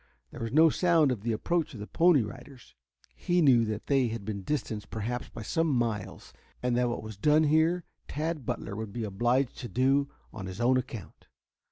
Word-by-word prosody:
There - - -9
was 115 -1 -3
no 160 +4 +6
sound 165 -5 +3
of 115 -6 -3
the 115 +2 -1
approach 155 +6 -1
of - - -8
the 105 - -5
Pony 165 0 +4
Riders. 125 +3 -11 0.4
He 175 0 0
knew 130 -8 +5
that 110 0 -4
they 135 -3 +2
had 110 -3 -5
been 100 -2 -4
distanced 110 -3 -3
perhaps 120 +3 -4
by 115 - -8
some 165 +8 0
miles, 120 -7 -2 0.3
and 125 -1 +1
that 125 0 +2
what 120 - -4
was 110 -2 -8
done 150 +8 +4
here 160 +3 +3 0.2
Tad 155 0 -3
Butler 115 -4 -4
would 110 -1 -5
be 120 - -3
obliged 120 +6 0
to 120 - -5
do 135 +2 +2 0.2
on 95 -4 -6
his 95 +3 -7
own 125 +2 +3
account. 115 -5 -7
125 Hz, 200 wpm, -29 LUFS, 110-150 Hz, 0.4 s, no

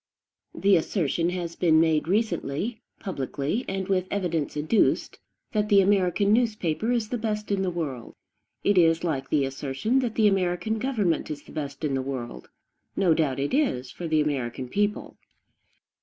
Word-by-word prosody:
The 195 -2 +4
assertion 170 0 0
has 175 -2 -4
been 160 -3 +4
made 160 -1 +2
recently, 200 - -1 0.2
publicly, 150 - -3
and 190 -1 -3
with 185 -2 +1
evidence 170 -7 -2
adduced, 155 +9 +1 0.3
that 210 -1 0
the 200 -2 +6
American 200 +1 +3
newspaper 220 -3 +1
is 230 -3 0
the 245 - -2
best 210 -1 -3
in 200 -1 +1
the 190 - 0
world. 150 -9 -5 0.5
It 200 -2 +4
is 165 -1 +3
like 135 -6 -2
the 145 -3 +2
assertion 135 - -1
that 240 -4 -2
the 215 -2 +4
American 195 +3 0
government 215 -10 0
is 145 -1 -6
the - - -15
best 145 0 -6
in 145 -3 0
the 135 - 0
world; 130 -3 -6 0.5
no 185 -4 +3
doubt 150 -5 0
it 140 - -2
is, 195 - 0
for 175 - -6
the 155 -1 +2
American 130 -4 -2
people. 205 +4 -1
175 Hz, 165 wpm, -26 LUFS, 150-210 Hz, 0.5 s, the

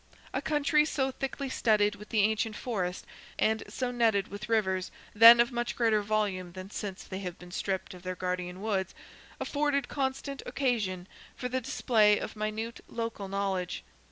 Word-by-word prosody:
A - - -1
country 300 0 +3
so 270 -3 0
thickly 270 +1 -4
studded 210 -5 +2
with 210 +1 -12
the 215 - +3
ancient 220 +1 +1
forest, 185 -8 -3 0.3
and 220 0 +2
so 250 -1 -3
netted 225 -5 +2
with 205 +2 -7
rivers 190 -5 +1 0.2
(then 230 +2 +10
of 235 +1 +4
much 240 0 -2
greater 225 -3 +3
volume 200 -4 -1
than 185 +2 -8
since 200 -3 -5
they 190 - -6
have 180 -3 -5
been 180 0 -12
stripped 190 +1 -2
of 180 - -11
their 185 0 -4
guardian 180 +1 -3
woods), 195 -4 -1 0.4
afforded 285 -2 0
constant 270 0 -2
occasion 205 -9 -1 0.3
for 250 - -4
the 260 +1 -1
display 215 -3 +3
of - - -5
minute 215 +2 -3
local 230 -4 -4
knowledge. 195 -2 -2
215 Hz, 165 wpm, -30 LUFS, 190-240 Hz, 0.4 s, then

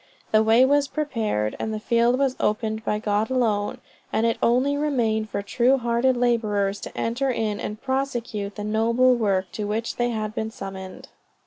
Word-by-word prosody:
The 215 - +5
way 225 +3 +5
was 285 +1 +3
prepared 225 - -2
and 220 - -2
the 215 - -3
field 235 +3 +2
was 270 -1 +1
opened 220 +1 -1
by 210 - 0
God 210 0 0
alone, 220 -6 0 0.3
and 225 - +1
it 230 - 0
only 255 +4 +2
remained 235 -7 0
for 200 - -3
true 250 +5 +2
hearted 240 +1 +1
laborers 210 -5 +1
to - - -9
enter 245 +4 -1
in 220 -4 -1
and 210 +1 -5
prosecute 240 -6 -3
the 210 - -5
noble 230 +4 +3
work 195 -6 0
to 210 - -4
which 220 +2 -2
they 240 0 +1
had 215 -2 -3
been 220 0 -3
summoned." 190 -3 -8
225 Hz, 180 wpm, -24 LUFS, 210-250 Hz, 0.3 s, The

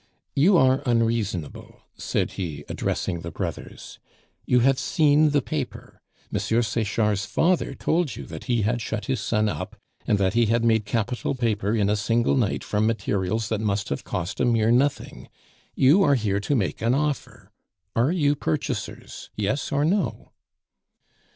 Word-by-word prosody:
"You 175 +7 +5
are 130 -2 +4
unreasonable," 115 -8 -1
said - - -2
he, 75 -6 -5
addressing 85 -3 -2
the 85 - -6
brothers. 80 - -7 0.5
"You 125 -1 +4
have 135 +1 +3
seen 155 -2 +3
the 145 -2 +1
paper; - - -5 0.3
M. - - +1
Sechard's 110 -3 0
father 175 +1 +1
told 160 -7 0
you - - -8
that - - -9
he 120 -4 +1
had 120 +3 0
shut 110 -1 -4
his 130 -2 -1
son 110 -1 0
up, 105 - -4 0.3
and 105 - +3
that 95 -1 +1
he 115 -1 +3
had 115 +1 +1
made 110 -2 +3
capital 115 +5 -2
paper 110 -4 0
in 105 -3 +2
a 105 - +2
single 115 +4 +1
night 120 -7 0
from 105 +1 0
materials 110 -1 -1
that 110 -1 -1
must 100 -2 -1
have 70 - -3
cost 85 +5 -4
a 125 - +2
mere 115 -2 +3
nothing. 135 +4 0 0.5
You 145 +9 +5
are 145 -6 +4
here 105 -5 0
to 140 +8 -1
make 100 -8 -1
an 115 +3 +2
offer. 150 0 -3 0.4
Are 120 +7 +2
you 145 -5 +2
purchasers, 140 - -4
yes 105 +7 -2
or 145 +1 +1
no?" 195 +5 -1
115 Hz, 165 wpm, -24 LUFS, 105-135 Hz, 0.5 s, You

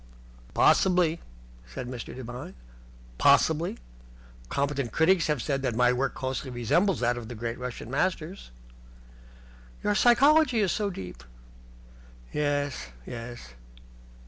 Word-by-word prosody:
"Possibly," 180 -3 +4 0.5
said 65 - -7
Mr. 125 -1 -7
Devine. 125 - -8 0.6
"Possibly. 160 +2 +3 0.7
Competent 140 -3 -1
critics 165 +1 +3
have 150 -6 0
said 135 -2 -1
that 125 -4 -1
my 125 +1 +4
work 135 +2 -1
closely 130 +1 -3
resembles 140 - +1
that 120 0 +1
of 115 - -9
the 120 - -7
great 115 +2 -4
Russian 125 -1 -6
Masters." 170 +4 -2 1.3
"Your 205 - +2
psychology 255 +3 +5
is 195 -4 +2
so 210 -1 -1
deep." 90 - -8 1.1
"Yes, 145 - -1 0.2
yes." 120 - -8
140 Hz, 115 wpm, -27 LUFS, 120-175 Hz, 1.3 s, psychology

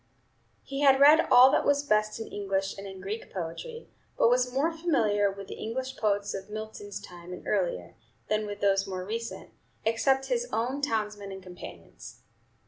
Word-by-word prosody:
He 275 0 -5
had 270 -2 +6
read 300 +3 +7
all 250 +2 +8
that - - +2
was 285 0 +2
best 215 -4 +1
in 225 - -5
English 195 -1 -2
and 195 0 -8
in 190 -1 -9
Greek 205 +4 -5
poetry, 185 - -6 0.3
but 230 - +4
was 250 0 +2
more 290 +6 +1
familiar 220 - +2
with 195 0 -9
the - - -8
English 260 +4 -4
poets 205 -3 0
of 195 +1 -6
Milton's 215 -1 -6
time 175 0 -11
and 180 - -8
earlier, 175 - -1 0.3
than 215 0 0
with 205 0 -7
those 195 0 +2
more 185 -1 -4
recent, 230 +3 -5 0.3
except 265 +4 +2
his - - -1
own 255 +5 -1
townsmen 210 -6 -2
and 190 -1 -8
companions. 180 -1 -11
215 Hz, 175 wpm, -28 LUFS, 195-265 Hz, 0.3 s, all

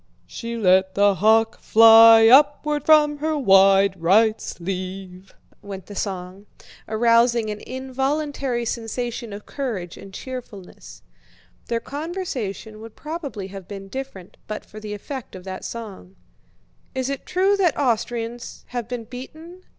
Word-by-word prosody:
"She 235 0 -6
let 190 -2 +3
the 200 0 +4
hawk 220 +3 +2
fly 225 0 +8
upward 290 +3 +4
from 300 -1 +5
her 310 +1 -1
wide 195 - +4
right 215 +6 +3
sleeve," 185 +1 -7 0.3
went 195 -2 -8
the 205 - -10
song, 190 0 -5 0.4
arousing 230 0 +2
an 210 - -6
involuntary 265 -1 -3
sensation 235 0 -4
of 205 +1 -9
courage 215 - -5
and 195 - -12
cheerfulness. 200 - -10 0.6
Their 235 -1 -1
conversation 265 - -6
would 225 -1 -11
probably 290 - -6
have 195 -2 -10
been 195 -1 -9
different 260 -8 -8
but 215 - -6
for 215 - -11
the 210 -1 -6
effect 260 +3 -8
of 185 - -10
that 185 0 -7
song. 200 -5 -8 0.8
"Is 260 -1 -2
it 275 0 -5
true 385 +2 +2
that 360 -5 +1
Austrians 235 -2 -3
have 240 -3 -4
been 245 -1 -5
beaten?" 315 +9 -11
225 Hz, 135 wpm, -22 LUFS, 195-265 Hz, 0.8 s, fly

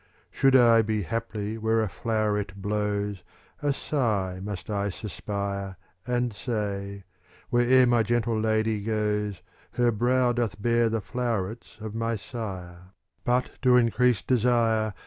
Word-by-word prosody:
Should 135 -1 +3
I 115 -3 +7
be 110 -1 -1
haply 110 +2 -3
where 110 0 +2
a - - -1
floweret 105 -1 -1
blows, 105 -1 -2 0.4
A 145 - +1
sigh 105 -11 -1
must 95 -3 -6
I 100 -1 -1
suspire. 100 -1 -4 0.3
And 125 -1 0
say, 100 -3 -4 0.2
" - - -28
Where'er 125 +1 +5
my 120 -1 +3
gentle 115 0 0
lady 110 -1 +1
goes, 105 -2 -1 0.3
Her 120 -1 +3
brow 125 +3 +2
doth 115 -4 -2
bear 115 +1 +2
the 110 -1 -1
flowerets 115 -2 -3
of 110 -1 -6
my 115 +1 -1
Sire: 95 -5 -7 0.3
But 125 +1 0
to 125 -1 +5
increase 125 -1 +3
desire. 115 -4 +2
110 Hz, 135 wpm, -26 LUFS, 100-120 Hz, 0.4 s, I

